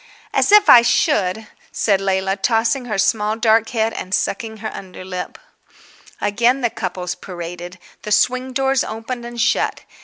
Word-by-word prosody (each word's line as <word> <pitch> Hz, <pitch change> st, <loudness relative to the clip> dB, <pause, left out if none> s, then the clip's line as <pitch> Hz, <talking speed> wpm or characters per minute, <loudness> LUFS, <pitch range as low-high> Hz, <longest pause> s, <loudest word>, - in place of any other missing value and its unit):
"As -, -, +2 dB
if 420 Hz, 0 st, +7 dB
I 240 Hz, -, +9 dB
should!" 220 Hz, -, +1 dB, 0.3 s
said 195 Hz, -3 st, +1 dB
Leila, 190 Hz, 0 st, 0 dB
tossing 230 Hz, +4 st, +1 dB
her 215 Hz, -4 st, -3 dB
small 210 Hz, +2 st, +1 dB
dark 225 Hz, 0 st, +2 dB
head 225 Hz, -2 st, -1 dB
and 185 Hz, -, -2 dB
sucking 225 Hz, -3 st, -3 dB
her 220 Hz, 0 st, -6 dB
underlip.... 185 Hz, -1 st, -7 dB, 0.8 s
Again 235 Hz, +6 st, +1 dB
the 240 Hz, -2 st, 0 dB
couples 180 Hz, -1 st, -4 dB
paraded. 175 Hz, 0 st, -8 dB, 0.2 s
The 210 Hz, -, -7 dB
swing 255 Hz, +4 st, +1 dB
doors 270 Hz, 0 st, +1 dB
opened 235 Hz, +2 st, -6 dB
and 240 Hz, 0 st, -8 dB
shut. 240 Hz, -, +1 dB
220 Hz, 150 wpm, -19 LUFS, 190-240 Hz, 0.8 s, I